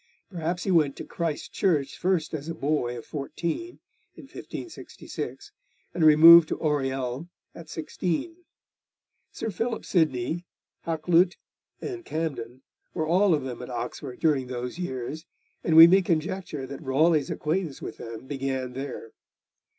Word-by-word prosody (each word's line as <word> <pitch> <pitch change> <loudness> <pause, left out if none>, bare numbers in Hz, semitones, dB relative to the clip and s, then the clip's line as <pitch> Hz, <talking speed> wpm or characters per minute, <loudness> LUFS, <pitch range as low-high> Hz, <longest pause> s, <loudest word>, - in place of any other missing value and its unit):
Perhaps 175 0 -3
he 195 - 0
went 150 -6 +3
to - - -7
Christ 165 -3 -4
Church 150 -8 +1
first 175 -4 0
as 155 +1 -4
a 165 - -4
boy 140 -5 -1
of 115 - -9
fourteen, 170 - -4 0.4
in - - -12
1566, 350 - -8 0.4
and 170 - 0
removed 160 +2 +9
to - - -2
Oriel 135 0 -1 0.2
at 165 -2 -12
sixteen. 175 - -3 0.9
Sir 225 - -4
Philip 225 +5 -3
Sidney, 155 -1 0 0.4
Hakluyt, 170 +3 +2 0.4
and 365 -3 -5
Camden 135 - -4 0.3
were 160 - 0
all 180 +2 +4
of 145 - -3
them 125 -2 -6
at 125 - -8
Oxford 125 +2 -5
during 145 -5 +2
those 125 +5 -5
years, 150 0 -5 0.4
and 160 - +2
we 165 +1 +12
may 190 +3 +6
conjecture 165 -3 -2
that 135 +2 -8
Raleigh's 150 +2 +2
acquaintance 160 -2 -2
with - - -7
them 115 +2 -8
began 130 -2 -3
there. 140 - -6
155 Hz, 140 wpm, -26 LUFS, 135-175 Hz, 0.9 s, we